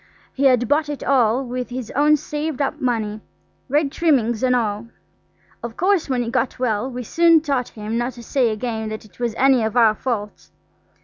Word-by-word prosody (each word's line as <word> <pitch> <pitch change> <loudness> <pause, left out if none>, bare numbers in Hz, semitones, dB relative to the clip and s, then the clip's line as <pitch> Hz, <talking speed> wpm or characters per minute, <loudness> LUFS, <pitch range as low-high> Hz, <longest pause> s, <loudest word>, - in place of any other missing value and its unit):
He 275 - 0
had 250 -3 +4
bought 295 +3 +1
it 290 - -5
all 255 -1 +2
with 250 0 -4
his 245 -2 -6
own 300 +2 +4
saved 300 -1 -4
up 280 - -2
money, 220 -4 -1 0.5
red 290 +1 +1
trimmings 245 -10 +1
and 255 -1 +3
all. 220 -1 -1 0.7
Of 235 -1 -7
course, 370 -4 +1
when 250 -2 0
he 230 - -4
got 255 0 -1
well 250 -1 -1
we 250 -1 -6
soon 335 +6 +4
taught 275 -5 -2
him 215 +2 -4
not 240 +2 -2
to 240 0 -11
say 250 0 +1
again 220 0 -3
that 215 0 -7
it 200 -1 -21
was 235 -2 -2
any 265 -2 +4
of 220 +2 -2
our 225 -3 +5
faults. 210 -3 -5
250 Hz, 195 wpm, -21 LUFS, 225-275 Hz, 0.7 s, our